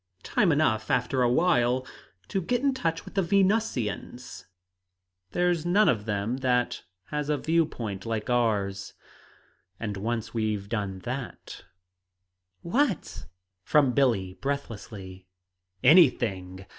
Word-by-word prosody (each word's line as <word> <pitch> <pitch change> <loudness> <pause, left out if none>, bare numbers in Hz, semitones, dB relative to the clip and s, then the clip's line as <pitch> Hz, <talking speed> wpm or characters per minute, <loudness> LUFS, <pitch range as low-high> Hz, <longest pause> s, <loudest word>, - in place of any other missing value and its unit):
"Time 190 -5 +2
enough, 125 -8 +1
after 125 +1 +1
a 120 - +4
while, 130 -4 +2 0.4
to 195 - -1
get 245 +7 0
in 275 -1 +3
touch 165 -11 -2
with - - -11
the 195 - +2
Venusians. 175 - -1 0.8
There's 175 - +1
none 195 +5 +3
of 105 -4 +1
them 105 +3 -1
that 125 -2 0 0.3
has 150 -1 -2
a 150 - +2
view 165 +2 +2
point 100 -8 -6
like 110 -2 -3
ours. 105 -5 0 0.8
And 105 -3 -4
once 115 +2 -3
we've 110 -3 -1
done 100 -4 -3
that 125 0 -6 0.5
" 90 0 -53
"What?" 275 -6 0 0.4
from 140 +1 +3
Billie, 115 -9 +1
breathlessly. 100 -6 -6 0.6
"Anything! 100 - +4
120 Hz, 120 wpm, -27 LUFS, 100-155 Hz, 0.8 s, a